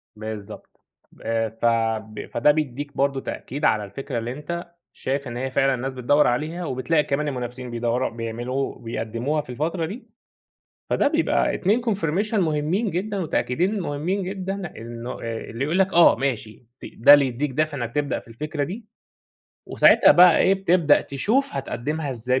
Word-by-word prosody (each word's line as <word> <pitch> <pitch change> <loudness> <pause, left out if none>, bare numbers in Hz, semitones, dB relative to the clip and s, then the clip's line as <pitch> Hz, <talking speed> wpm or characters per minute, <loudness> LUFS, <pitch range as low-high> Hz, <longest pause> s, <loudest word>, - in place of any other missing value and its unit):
بالضبط. 110 -1 -9 0.4
آآ، 115 -1 -1
ف 115 +2 -5 0.5
ب - - -6
فده 135 +5 +3
بيديك 145 -1 -3
برضه 140 -1 +1
تأكيد 140 +4 -5
على 105 -1 +3
الفكرة 115 +4 -5
اللي 120 +2 -4
أنت 170 +4 -6 0.2
شايف 140 0 -3
إن 120 0 -5
هي 130 +1 -3
فعلًا 135 +1 +2
الناس 130 +2 -4
بتدور 135 +4 +3
عليها 155 +8 -1
وبتلاقي 150 +4 +1
كمان 150 +2 -1
المنافسين 125 -2 -5
بيدوروا 120 +2 0
بيعملوا 120 +4 -4
بيقدموها 115 +6 -2
في 145 - -19
الفترة 160 +7 -2
دي، 220 +8 -8 0.8
فده - - +2
بيبقى - - +1
2 210 +6 +1
confirmation 200 0 -1
مهمين 175 +3 0
جدًا، 200 +4 -2
وتأكيدين 180 - 0
مهمين 175 +4 -2
جدًا، 190 -1 -4
إنه 115 +1 -7
آآ، 115 -1 -3
اللي 115 +4 -3
يقول 170 +5 0
لك، 190 0 +2
آه، 170 0 +7
ماشي، 120 -4 -3 0.2
ت - - -8
ده 130 +5 +8
اللي 140 -2 +6
يديك 130 +4 -2
دافع 155 +1 -1
إنك 120 -2 -5
تبدأ 145 -1 0
في - - -20
الفكرة 145 +6 -4
دي 205 +10 -6 0.8
وساعتها - - +6
بقى 175 -1 +7
إيه، 190 - +4
بتبدأ 175 -6 +3
تشوف 220 - 0
هتقدمها 140 +2 -3
إزاي 125 +1 -1
145 Hz, 165 wpm, -23 LUFS, 120-170 Hz, 0.8 s, ده